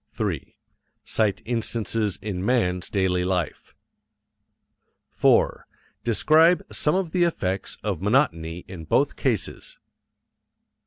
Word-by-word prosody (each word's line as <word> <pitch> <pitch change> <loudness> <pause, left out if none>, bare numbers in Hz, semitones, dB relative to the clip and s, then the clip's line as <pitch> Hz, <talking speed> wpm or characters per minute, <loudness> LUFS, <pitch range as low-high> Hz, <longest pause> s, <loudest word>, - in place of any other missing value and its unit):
3. - - -3 0.5
Cite 105 -4 0
instances 115 -3 -1
in 95 -4 -3
man's 90 -7 +1
daily 95 -2 +1
life. 90 -2 -3 1.4
4. - - +2 0.4
Describe 160 +9 +4
some 150 - +1
of 185 -4 -1
the 180 0 +2
effects 95 - -1
of 100 -5 -2
monotony 90 - +1
in 90 -3 -8
both 80 - +1
cases. - - -2
105 Hz, 100 wpm, -24 LUFS, 90-125 Hz, 1.4 s, Describe